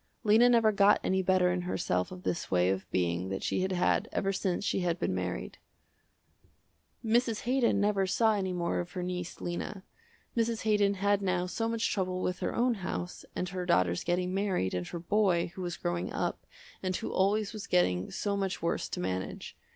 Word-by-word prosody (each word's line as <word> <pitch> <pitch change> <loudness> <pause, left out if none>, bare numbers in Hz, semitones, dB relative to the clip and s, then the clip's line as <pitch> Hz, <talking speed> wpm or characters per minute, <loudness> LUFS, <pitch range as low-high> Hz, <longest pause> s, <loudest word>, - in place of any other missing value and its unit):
Lena 225 +3 +6
never 230 -3 +5
got 200 0 +5
any 190 0 +1
better 185 -1 +3
in 180 0 -1
herself 90 - -1
of 185 0 -9
this 170 - -2
way 90 0 +3
of 95 0 -3
being 90 0 0
that 95 - -4
she - - 0
had 190 +1 0
had 180 -1 +1
ever 195 0 0
since 190 0 -1
she - - +1
had 175 -2 0
been - - -1
married. 90 -9 -4 1.5
Mrs. 230 0 +2
Haydon 245 -4 +2
never 200 -2 +2
saw 220 +3 +3
any 190 -3 -1
more 175 -1 -1
of 175 0 -5
her 180 - -3
niece, 180 -1 -4
Lena. 185 +3 -4 0.5
Mrs. 230 -1 0
Haydon 205 -2 +3
had 200 +1 +2
now 185 -2 0
so 225 +5 -2
much 230 0 0
trouble 185 -2 -1
with 180 0 -1
her - - -2
own 245 +1 +3
house, 180 -1 -4
and 180 - -2
her 185 -1 -4
daughters 90 - +2
getting 180 +1 0
married, 190 - 0
and 90 -1 -2
her - - -5
boy, 175 -1 +1
who 185 - -7
was 175 -1 -3
growing 175 0 -2
up, - - -3 0.3
and 185 -1 -1
who - - -3
always 205 +3 +1
was 215 -2 -7
getting 90 +1 +2
so 205 -1 -2
much 195 -1 -2
worse 170 - -1
to - - -4
manage. 95 +1 -4
185 Hz, 195 wpm, -30 LUFS, 175-205 Hz, 1.5 s, Lena